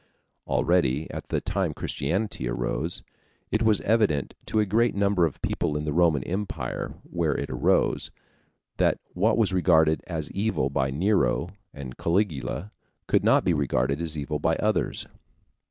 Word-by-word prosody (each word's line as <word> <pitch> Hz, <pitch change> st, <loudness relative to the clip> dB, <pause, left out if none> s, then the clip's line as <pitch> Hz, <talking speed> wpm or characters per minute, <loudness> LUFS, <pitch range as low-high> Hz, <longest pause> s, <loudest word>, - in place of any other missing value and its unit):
Already 80 Hz, -4 st, +2 dB
at -, -, -7 dB
the -, -, +1 dB
time -, -, -1 dB
Christianity 85 Hz, -, -2 dB
arose, -, -, -2 dB, 0.5 s
it 110 Hz, -, +1 dB
was 110 Hz, -3 st, +3 dB
evident 105 Hz, -, +1 dB
to 110 Hz, -, +1 dB
a 105 Hz, -, +3 dB
great 110 Hz, +3 st, +2 dB
number 100 Hz, -4 st, +3 dB
of 75 Hz, -, -9 dB
people 75 Hz, -, -1 dB
in 75 Hz, -, -3 dB
the 75 Hz, -, -1 dB
Roman 80 Hz, -5 st, +3 dB
Empire 95 Hz, +3 st, -4 dB
where 85 Hz, -4 st, -1 dB
it -, -, -4 dB
arose, -, -, +1 dB, 0.7 s
that -, -, +3 dB, 0.2 s
what 105 Hz, +6 st, +2 dB
was 105 Hz, -5 st, +2 dB
regarded 80 Hz, -4 st, +4 dB
as 80 Hz, -4 st, -4 dB
evil 100 Hz, -10 st, 0 dB
by 65 Hz, -1 st, 0 dB
Nero 85 Hz, -, +1 dB, 0.2 s
and 65 Hz, -3 st, -8 dB
Caligula 85 Hz, +1 st, -1 dB, 0.3 s
could -, -, +2 dB
not -, -, +4 dB
be 90 Hz, -, +3 dB
regarded 70 Hz, 0 st, 0 dB
as 80 Hz, -2 st, -2 dB
evil 75 Hz, +1 st, -3 dB
by 80 Hz, -, +1 dB
others. 105 Hz, -4 st, 0 dB
85 Hz, 155 wpm, -26 LUFS, 75-100 Hz, 0.7 s, regarded